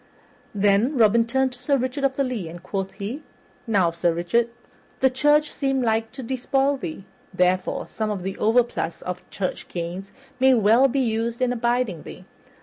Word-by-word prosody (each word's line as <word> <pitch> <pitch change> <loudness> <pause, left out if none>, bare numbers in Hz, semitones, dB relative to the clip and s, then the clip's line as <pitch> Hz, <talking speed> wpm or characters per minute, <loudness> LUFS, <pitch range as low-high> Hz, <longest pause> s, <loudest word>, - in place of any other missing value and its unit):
Then 205 +7 +2
Robin 230 0 +4
turned 265 +2 +1
to 250 - -12
Sir 275 +2 +1
Richard 260 +2 -3
of 270 -1 +2
the 275 - +1
Lea, 235 -10 -3
and 175 +1 -10
quoth 195 0 -3
he, 215 +9 -5 0.5
"Now, 190 -6 +3
Sir 170 +1 +1
Richard, 175 +8 +1 0.5
the 265 -1 +4
church 295 +3 +3
seemed 270 -2 0
like 225 0 0
to 265 0 -7
despoil 270 +3 0
thee, 190 -5 -7 0.3
therefore 185 0 +1
some 220 -1 -3
of 200 -4 -3
the 195 +1 -3
overplus 225 -6 +1
of 180 0 -4
church 190 -2 -4
gains 175 +3 -5 0.3
may 260 0 +6
well 230 +4 +5
be 270 +1 0
used 230 0 -1
in 250 -1 +1
aiding 240 -7 0
thee. - - -11
230 Hz, 175 wpm, -23 LUFS, 195-260 Hz, 0.5 s, may